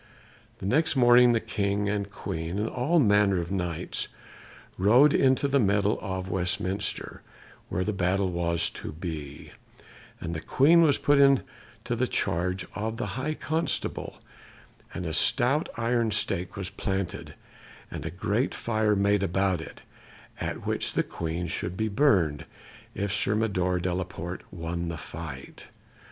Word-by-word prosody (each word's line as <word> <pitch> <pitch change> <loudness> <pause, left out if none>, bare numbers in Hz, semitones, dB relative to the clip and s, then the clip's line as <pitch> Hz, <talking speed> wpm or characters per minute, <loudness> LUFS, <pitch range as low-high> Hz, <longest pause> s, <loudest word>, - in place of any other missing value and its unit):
The - - -8
next 150 +10 +3
morning 120 -1 +6
the 115 - +2
King 100 -1 -1
and 100 -1 -1
Queen, 80 -3 -5
and 105 +2 0
all 130 +10 0
manner 105 - +4
of 85 +1 -4
Knights, 90 -3 -2 0.7
rode 120 +10 +5
into 130 +1 +3
the 140 0 +2
meadow 100 -1 +2
of 95 -2 -4
Westminster, 95 +2 -2 0.5
where 90 - -1
the 105 - -1
battle 95 0 0
was 85 -1 0
to - - -7
be; 75 -4 -7 0.7
and 85 - -4
the 80 - -3
Queen 165 +6 +5
was 150 -4 +4
put 145 -1 +3
into 140 -1 +5 0.5
the 125 +2 0
charge 90 -1 -1
of 110 +3 -3
the - - -2
High 140 +6 -2
Constable, 160 +2 -2 0.7
and 90 - -5
a 80 - -3
stout 135 - +2
iron 115 0 +1
stake 90 -4 0
was 95 -2 -5
planted, 95 -1 -4 0.6
and - - -6
a - - -3
great - - -1
fire 110 -2 +1
made 100 0 +2
about 95 -1 +1
it, - - -11 0.6
at - - -4
which - - -1
the - - +1
Queen 85 +1 -4
should 90 +2 -3
be 110 0 0
burned 100 - +2 0.5
if 100 0 -2
Sir 100 0 +1
Mador 95 -5 0
de 90 0 -1
la 95 +1 -1
Porte 90 0 -8
won 85 0 -4
the 85 -1 -4
fight. 75 -2 -9
100 Hz, 150 wpm, -27 LUFS, 90-115 Hz, 0.7 s, morning